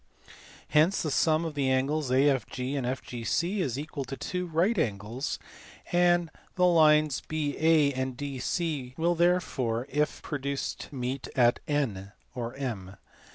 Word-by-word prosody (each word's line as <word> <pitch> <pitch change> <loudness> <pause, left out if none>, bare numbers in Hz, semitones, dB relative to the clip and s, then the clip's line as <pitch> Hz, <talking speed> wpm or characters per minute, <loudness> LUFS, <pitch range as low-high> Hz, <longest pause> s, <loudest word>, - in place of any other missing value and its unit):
Hence 160 +7 +3
the 155 - -1
sum 160 +2 +2
of 160 - -3
the 140 -2 0
angles 135 +2 +1
AFG 130 0 +1
and 130 -3 -1
FGC 130 - -2
is 135 -9 -1
equal 145 -1 -4
to 135 +2 -6
two 180 0 -3
H - - -13
right 185 +8 +2
angles, 110 +1 -2 0.5
and 175 -1 +3 0.2
the 180 - +3
lines 155 -4 +4
BA 155 -1 +2
and 130 -1 -2
DC 140 0 -3
will 170 +2 +2
therefore 160 -9 +1
if 150 +1 -1
pro 150 - -3
duced 140 0 -4
meet 130 -1 -4
at 120 -2 +4
N 110 -10 -1 0.2
(or 120 -1 -5
J 135 -3 -1
145 Hz, 145 wpm, -28 LUFS, 130-160 Hz, 0.5 s, lines